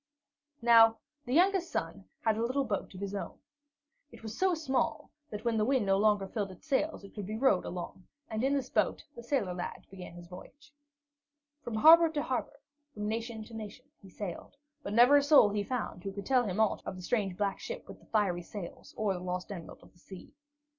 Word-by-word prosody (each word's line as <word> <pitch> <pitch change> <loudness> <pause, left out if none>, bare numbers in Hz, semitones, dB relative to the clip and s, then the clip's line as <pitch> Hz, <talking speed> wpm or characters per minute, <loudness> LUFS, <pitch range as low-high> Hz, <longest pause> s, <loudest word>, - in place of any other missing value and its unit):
Now 225 -1 +7 0.3
the 250 - -2
youngest 370 +1 +3
son 95 -13 -4 0.2
had 220 -1 +2
a 220 - -2
little 260 +4 0
boat 205 -5 -3
of - - -8
his 200 0 -4
own. 200 - -5 0.7
It 230 -2 -14
was 220 0 -6
so 375 -2 +2
small 285 -5 -1 0.2
that, 210 +2 -7
when 230 -1 +1
the 215 - +2
wind 255 -1 +2
no 195 0 +3
longer 205 -2 +3
filled 200 0 -3
its 185 - -14
sails, 300 -3 0
it 200 - -12
could 205 -3 -6
be 215 +1 -4
rowed 230 -7 +3
along, 180 +1 -7 0.2
and 220 +1 -3
in 275 +2 +2
this 270 -2 -1
boat - - +1
the 235 - -8
sailor 235 -7 -1
lad 180 0 -6
began 185 -3 -9
his 175 0 -10
voyage. 285 - -13 0.9
From 235 - -4
harbor 325 +8 +8
to 290 -1 -1
harbor, 280 0 -3 0.4
from 210 0 -3
nation 225 0 -3
to 225 - -14
nation, 220 +3 -8 0.2
he 195 - -14
sailed, 195 +6 -7 0.3
but 205 - -5
never 245 +6 +7
a - - +5
soul 285 -7 +6
he 205 0 -1
found 220 -6 -4
who 195 - -4
could 200 0 -7
tell 255 -2 +3
him 195 0 -3
aught 220 -2 +2
of - - -5
the 185 - -9
strange 195 -4 -1
black 200 -1 -1
ship - - -7
with - - -11
the - - -23
fiery 195 -5 +1
sails 175 0 -9
or 210 -2 +1
the 180 - -5
lost 180 +2 -4
Emerald 175 -5 -9
of - - -19
the 175 - -25
Sea. 190 0 -12
215 Hz, 220 wpm, -31 LUFS, 195-260 Hz, 0.9 s, harbor